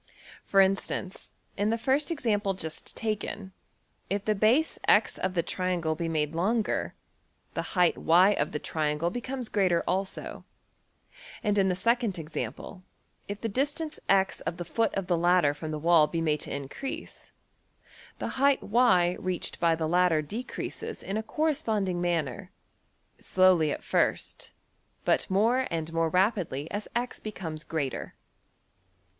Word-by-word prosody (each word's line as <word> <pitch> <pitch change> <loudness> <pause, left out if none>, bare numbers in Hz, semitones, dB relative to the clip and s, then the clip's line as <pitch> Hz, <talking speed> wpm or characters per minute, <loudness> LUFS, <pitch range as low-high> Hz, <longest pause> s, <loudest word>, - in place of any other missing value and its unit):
For 195 - +4
instance, 190 -1 -1 0.3
in 205 +1 +1
the 230 - +1
first 270 +6 +1
example 210 - 0
just 160 -4 -6
taken, 210 -3 -3 0.6
if 200 +1 -2
the 215 - +3
base~$x$ 225 +10 +3
of 185 0 -2
the 170 - +2
triangle 180 -4 -1
be 165 +1 -3
made 150 -1 -1
longer, 210 +6 0 0.6
the - - -1 0.2
height~$y$ 180 +2 +5
of 145 -5 -1
the - - -2
triangle 155 +2 -1
becomes 250 +2 -4
greater 185 -6 +2
also, 190 +1 -3 1.0
and 210 -2 +1
in 190 -1 +3
the 180 - +1
second 230 0 +1
example, 165 +4 -6 0.5
if 205 0 -6
the 230 - -1
distance~$x$ 270 - 0
of 170 - -4
the 175 - -5
foot 225 +7 0
of 195 - -1
the 180 -1 +1
ladder 175 -3 +3
from 155 +2 -7
the 155 - -3
wall 160 0 +5
be 165 - -3
made 155 -2 +1
to - - -7
increase, 140 - -6 0.9
the 260 - -4
height~$y$ 220 -9 +4
reached 185 -1 -2
by 165 -1 +3
the 160 -1 -2
ladder 175 -2 +3
decreases 255 - -5
in 195 - -4
a 220 - 0
corresponding 220 - 0
manner, 165 -8 -1 0.7
slowly 185 -5 +4
at - - -4
first, - - 0 0.5
but - - +2
more 230 +7 +2
and 165 -1 -3
more 165 0 +1
rapidly 180 - +1
as 205 +1 -4
$x$~becomes 200 -9 -4
greater. 145 -6 -3
185 Hz, 140 wpm, -28 LUFS, 165-220 Hz, 1.0 s, height~$y$